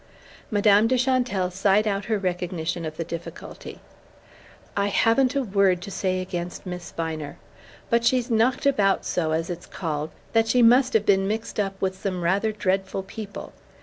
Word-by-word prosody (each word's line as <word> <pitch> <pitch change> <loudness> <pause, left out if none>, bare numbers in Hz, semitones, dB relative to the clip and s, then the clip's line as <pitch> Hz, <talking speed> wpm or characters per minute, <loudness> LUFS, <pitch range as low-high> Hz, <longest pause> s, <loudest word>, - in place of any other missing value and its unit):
Madame 205 0 +4
de 255 +2 +2
Chantelle 245 -8 +1
sighed 195 +3 +2
out 200 -1 -1
her 220 -1 0
recognition 175 -3 -3
of 155 0 -6
the 165 - -2
difficulty. 170 0 -8 1.0
"I 200 0 +1
haven't 250 +6 +3
a 275 - +1
word 195 -4 +2
to 200 - -7
say 185 0 -1
against 180 -1 -5
Miss 180 -2 -6
Viner; 160 -3 -5 0.5
but 235 0 +3
she's 245 +1 +2
knocked 235 +4 +2
about 205 -8 +2
so, 160 -3 -1
as 165 +2 -1
it's 175 0 -7
called, 155 -3 -3 0.2
that 225 -1 +3
she 245 +1 +4
must 250 +3 +5
have 215 -2 +3
been 195 -1 +3
mixed 220 +1 -3
up 195 -1 -2
with 190 0 -2
some 185 -3 -2
rather 200 +5 +1
dreadful 195 -2 -1
people. 205 0 -8
195 Hz, 170 wpm, -24 LUFS, 180-225 Hz, 1.0 s, must